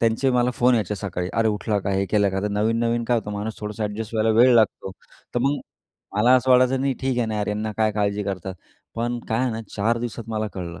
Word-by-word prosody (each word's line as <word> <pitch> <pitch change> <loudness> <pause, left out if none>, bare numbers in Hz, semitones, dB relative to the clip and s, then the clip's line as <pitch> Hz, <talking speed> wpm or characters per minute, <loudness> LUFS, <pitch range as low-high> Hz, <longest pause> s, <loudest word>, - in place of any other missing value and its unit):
त्यांचे 115 +4 +2
मला 125 0 +2
फोन 125 +1 +3
यायचे 105 -3 0
सकाळी 90 -3 -4
अरे, 115 0 +2
उठला 105 0 -1
का? 100 0 -3
हे 95 0 +1
केलं 100 -2 +3
का? 95 0 -2
तर 105 - 0
नवीन-नवीन 115 +3 0
काय 120 +1 +2
होतं 105 - -6
माणूस 105 +2 -4
थोडंसं 105 0 -4
एडजस्ट 105 +2 -5
व्हायला 110 0 +2
वेळ 125 +1 +7
लागतो. 110 -4 +2 0.4
तर - - +2
मग, 140 +3 +1 0.6
मला 120 +5 +5
असं 130 +1 0
वाटायचं 130 +1 +4
नाही 135 0 0
ठीक 130 -2 0
आहे 120 - +1
ना 110 - -3
यार, 105 -1 -1
ह्यांना 105 +1 -2
काय 110 -1 +2
काळजी 105 0 0
करतात. 95 -2 -4 0.4
पण 120 +1 -2
काय 110 - 0
आहे 130 - +1
ना 110 0 -4 0.2
चार 115 +3 +1
दिवसात 120 -1 -5
मला 110 -1 -2
कळलं 85 -3 -6
110 Hz, 240 wpm, -23 LUFS, 105-120 Hz, 0.6 s, वेळ